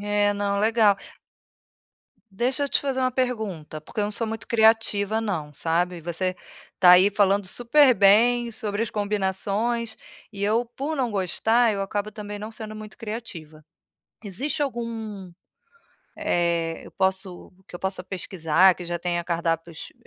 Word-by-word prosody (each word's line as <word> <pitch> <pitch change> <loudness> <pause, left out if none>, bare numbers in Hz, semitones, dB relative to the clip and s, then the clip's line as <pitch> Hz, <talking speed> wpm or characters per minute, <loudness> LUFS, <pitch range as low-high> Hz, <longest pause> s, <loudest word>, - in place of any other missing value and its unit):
É 205 0 +1
não, 200 0 -1
legal 215 -2 +4 1.3
Deixa 255 +8 -1
eu - - -3
te - - +1
fazer 270 -2 -2
uma 255 0 +2
pergunta, 215 -12 -3
porque 180 - -6
eu 205 - +2
não 210 - -2
sou 225 +2 -1
muito 225 0 -6
criativa 220 -2 +3
não, 160 -9 -3
sabe. 175 +3 -1
Você 175 +3 -2 0.4
está 180 -1 +6
aí 185 +3 +7
falando 200 -1 +2
super 250 +5 +4
bem 235 +4 +4
sobre 215 -1 -3
as 230 - -3
combinações, 210 +3 -1 0.4
e 200 -1 -7
eu, 220 +4 +2
por 275 +6 -5
não 245 -5 -1
gostar, 220 +5 +2
eu 200 - -3
acabo 205 +2 -3
também 205 0 -7
não 215 - -6
sendo 215 -1 -7
muito 215 0 -10
criativa. 170 -9 -8 0.6
Existe 265 +10 -3
algum, 225 -7 -5 0.8
eh, 170 -1 0
eu - - -13
posso 190 -2 -2
que - - -15
eu - - -7
possa 190 -1 -3
pesquisar, 180 -1 +2
que 180 - -8
já 175 0 -4
tenha 175 -1 -2
cardápios 165 -1 -3
205 Hz, 150 wpm, -24 LUFS, 180-225 Hz, 1.3 s, aí